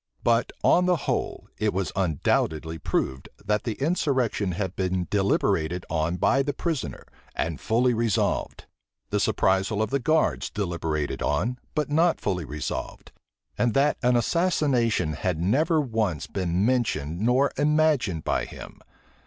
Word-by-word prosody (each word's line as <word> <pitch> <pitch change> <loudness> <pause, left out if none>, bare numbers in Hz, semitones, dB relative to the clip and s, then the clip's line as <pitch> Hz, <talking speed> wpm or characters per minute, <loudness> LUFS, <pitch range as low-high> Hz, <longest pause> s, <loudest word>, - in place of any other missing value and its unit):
But, 115 0 +2
on 180 +1 +4
the 180 - +4
whole, - - -2
it 105 -3 0
was 95 -1 -1
undoubtedly 80 -2 0
proved, 65 -2 -2 0.2
that 105 0 0
the 115 - -1
insurrection 130 - 0
had 95 +1 -3
been 95 -1 -1
deliberated 95 -4 +1
on 80 +2 0
by 135 +8 +3
the 145 +1 -1
prisoner, 165 -4 -3 0.3
and 80 -4 -2
fully 120 +2 +2
resolved; 115 -3 -1 0.5
the - - +1
surprisal 95 +2 +1
of 110 - 0
the 140 - +1
guards 155 +5 +1
deliberated 80 -7 -2
on, 105 - 0 0.2
but 150 -1 -1
not 165 +3 +3
fully 90 -4 -2
resolved; 75 +1 -5 0.5
and 120 -2 +1
that 140 +2 +3
an 125 -1 +3
assassination 125 - +1
had 80 +2 -2
never 155 - +2
once 110 - -1
been 90 +1 -1
mentioned 90 - 0
nor 125 +5 +3
imagined 145 - +2
by - - 0
him. - - -11
110 Hz, 140 wpm, -25 LUFS, 90-135 Hz, 0.5 s, on